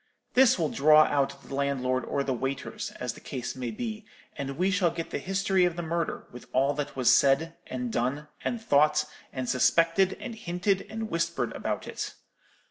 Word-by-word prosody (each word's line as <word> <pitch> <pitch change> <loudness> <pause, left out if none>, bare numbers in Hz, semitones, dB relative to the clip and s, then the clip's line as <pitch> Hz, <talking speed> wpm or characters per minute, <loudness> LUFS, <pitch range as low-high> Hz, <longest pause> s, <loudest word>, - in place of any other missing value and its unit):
This 255 -2 +6
will 160 -4 0
draw 155 +2 +6
out 140 -1 0
the - - -10
landlord 130 -2 0
or 140 - -1
the 135 - -1
waiters, 135 +2 -3
as 125 -2 -3
the - - -12
case 125 -2 -5
may 125 -2 -4
be, 220 - -5 0.3
and 135 -1 -5
we 185 +3 +2
shall 185 -3 +3
get 165 0 -5
the - - -2
history 195 0 +1
of 175 -2 +2
the 175 - -4
murder, 165 0 -2
with 125 - -11
all 135 +2 +3
that 145 0 -4
was 130 -2 +4
said, 140 +4 +3
and 125 -2 -4
done, 140 +5 -1 0.2
and 240 - -1
thought, 150 -6 +3 0.3
and 130 -2 -4
suspected 165 +9 +3
and 235 - -6
hinted, 190 -1 -1
and 220 0 -5
whispered 165 0 -1
about - - -3
it. - - -5
150 Hz, 190 wpm, -28 LUFS, 135-180 Hz, 0.3 s, This